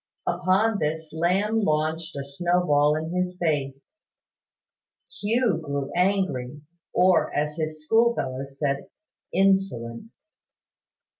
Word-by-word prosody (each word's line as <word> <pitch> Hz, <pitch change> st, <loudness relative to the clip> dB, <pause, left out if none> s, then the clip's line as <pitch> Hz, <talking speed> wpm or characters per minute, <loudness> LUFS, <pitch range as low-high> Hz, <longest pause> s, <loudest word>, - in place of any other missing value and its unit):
Upon 190 Hz, +5 st, +2 dB
this 155 Hz, +1 st, -3 dB
Lamb 190 Hz, +7 st, +1 dB
launched 160 Hz, -2 st, -1 dB
a 140 Hz, -, -3 dB
snowball 150 Hz, -1 st, +2 dB
in 160 Hz, +2 st, -3 dB
his 180 Hz, 0 st, -1 dB
face. 140 Hz, -5 st, -1 dB, 1.4 s
Hugh 225 Hz, -2 st, +1 dB
grew 140 Hz, -2 st, -3 dB
angry, 180 Hz, -8 st, 0 dB, 0.3 s
or, 180 Hz, -4 st, +3 dB
as 150 Hz, +1 st, 0 dB
his 155 Hz, -1 st, -4 dB
schoolfellows 140 Hz, -, +1 dB
said, 140 Hz, -1 st, -2 dB, 0.4 s
insolent. 190 Hz, -, +1 dB
160 Hz, 95 wpm, -25 LUFS, 145-185 Hz, 1.4 s, or